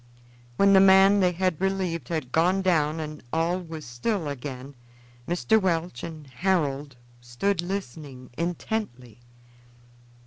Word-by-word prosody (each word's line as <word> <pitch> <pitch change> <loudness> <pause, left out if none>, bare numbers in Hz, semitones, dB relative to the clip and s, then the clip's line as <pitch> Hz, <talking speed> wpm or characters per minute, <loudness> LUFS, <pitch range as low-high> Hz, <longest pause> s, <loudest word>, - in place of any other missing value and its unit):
When 200 0 +5
the 190 - +8
man 195 +1 +6
they 180 -2 +3
had 180 -2 -1
relieved 190 -3 -1
had 155 -7 -3
gone 180 +5 +2
down 160 -4 +1
and 155 -1 -6
all 165 +3 0
was 160 -3 -8
still 155 - -2
again, 135 -1 -6 0.5
Mr. 210 +5 +2
Welch 170 -7 -1
and 160 -3 -8
Harold 145 -2 -1 0.3
stood 165 +11 -1
listening 145 -8 -6
intently. 170 - -4
165 Hz, 125 wpm, -26 LUFS, 145-190 Hz, 0.5 s, the